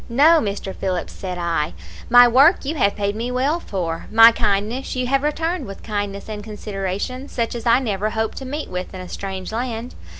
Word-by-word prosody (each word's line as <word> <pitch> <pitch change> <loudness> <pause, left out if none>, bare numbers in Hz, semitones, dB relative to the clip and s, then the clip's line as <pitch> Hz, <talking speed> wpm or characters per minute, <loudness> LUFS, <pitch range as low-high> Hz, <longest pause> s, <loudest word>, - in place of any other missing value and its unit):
"'No, 305 +7 +5
Mr. 200 -5 -4
Phillips,' 180 -3 -3
said 185 -2 -6
I, 165 - -1 0.3
'my 245 +1 +8
work 275 +8 +5
you 290 - -1
have 205 -10 +1
paid 200 0 -1
me 230 +3 -3
well 270 +6 0
for; 170 - -4
my 225 +1 +9
kindness 225 +4 -1
you 255 0 -1
have 270 +2 +1
returned 320 +1 -1
with 195 - -9
kindness 205 -2 -4
and 210 -1 -6
consideration 210 +4 -4
such 230 -4 -2
as 235 0 -5
I 235 - +6
never 215 -5 -1
hoped 220 0 -2
to 265 - -8
meet 295 +4 -4
with 180 +1 -5
in 185 - -6
a 180 - -8
strange 190 0 -6
land. 235 +1 -4
220 Hz, 200 wpm, -21 LUFS, 195-255 Hz, 0.3 s, my